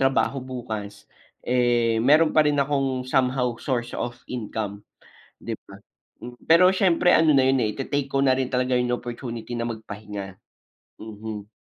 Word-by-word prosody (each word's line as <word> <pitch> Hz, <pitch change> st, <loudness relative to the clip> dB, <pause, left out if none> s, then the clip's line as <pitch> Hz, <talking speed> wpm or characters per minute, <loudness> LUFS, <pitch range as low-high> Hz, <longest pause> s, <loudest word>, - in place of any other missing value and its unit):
trabaho 135 Hz, 0 st, +1 dB
bukas, 110 Hz, -5 st, -7 dB, 0.4 s
eh, 120 Hz, -2 st, +2 dB
mayro'n 155 Hz, +6 st, +4 dB
pa 155 Hz, -, +5 dB
rin 145 Hz, -, +1 dB
akong 135 Hz, -2 st, 0 dB
somehow 130 Hz, -1 st, +1 dB
source 120 Hz, -3 st, -2 dB
of 120 Hz, 0 st, -4 dB
income, 105 Hz, -4 st, -5 dB, 0.6 s
di -, -, -5 dB
ba? -, -, -14 dB, 0.6 s
Pero 175 Hz, +3 st, +6 dB
siyempre 180 Hz, -2 st, +3 dB
ano 160 Hz, -1 st, +4 dB
na 130 Hz, -1 st, +4 dB
yun, 135 Hz, -, +3 dB
eh, 105 Hz, -, -1 dB
ite-take 140 Hz, +2 st, -2 dB
ko 135 Hz, -, +1 dB
na 130 Hz, -1 st, +3 dB
rin 130 Hz, 0 st, -2 dB
talaga 125 Hz, 0 st, +1 dB
yung 125 Hz, 0 st, 0 dB
opportunity 120 Hz, -1 st, -5 dB
na 115 Hz, -, -2 dB
magpahinga. 105 Hz, -4 st, -7 dB, 0.7 s
Mhm. 110 Hz, -1 st, -8 dB
125 Hz, 150 wpm, -24 LUFS, 110-135 Hz, 0.7 s, Pero